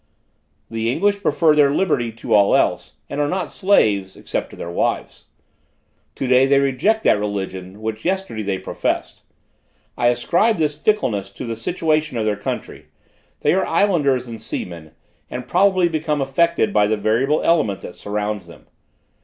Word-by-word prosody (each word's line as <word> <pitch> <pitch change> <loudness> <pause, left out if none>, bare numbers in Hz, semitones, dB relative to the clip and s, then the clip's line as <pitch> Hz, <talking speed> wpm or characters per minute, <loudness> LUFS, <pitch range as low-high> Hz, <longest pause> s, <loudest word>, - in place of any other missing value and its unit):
"The 115 +1 -1
English 200 +8 +1
prefer 160 -5 +3
their 145 -2 +5
liberty 140 -7 0
to 115 +1 -4
all 100 -1 +5
else, - - 0
and 145 - -3
are 145 - +1
not 180 -1 -2
slaves, 105 - +2
except - - -4
to - - -12
their 85 - -6
wives. - - -2 0.9
Today 130 0 +3
they 140 0 +4
reject 140 - +1
that 105 - +4
religion, 95 -1 -5
which 110 0 -4
yesterday 190 - -2
they 100 -2 -2
professed. - - -3 0.7
I 120 - +1
ascribe 175 - +2
this 150 -2 0
fickleness 105 - 0
to - - -7
the 115 -1 -3
situation 155 +2 -1
of 110 - -1
their 105 -1 +1
country; 105 - -6 0.5
they - - +3
are 190 - +2
islanders 150 -9 +1
and 115 -2 -8
seamen, 85 -7 -6 0.4
and 125 0 -6
probably 185 +2 +3
become 155 -2 -1
affected 140 +1 +1
by 105 -1 +4
the 110 +1 0
variable 120 +8 +1
element 130 - +2
that - - -8
surrounds 105 +1 -4
them. - - -15
130 Hz, 160 wpm, -20 LUFS, 105-165 Hz, 0.9 s, their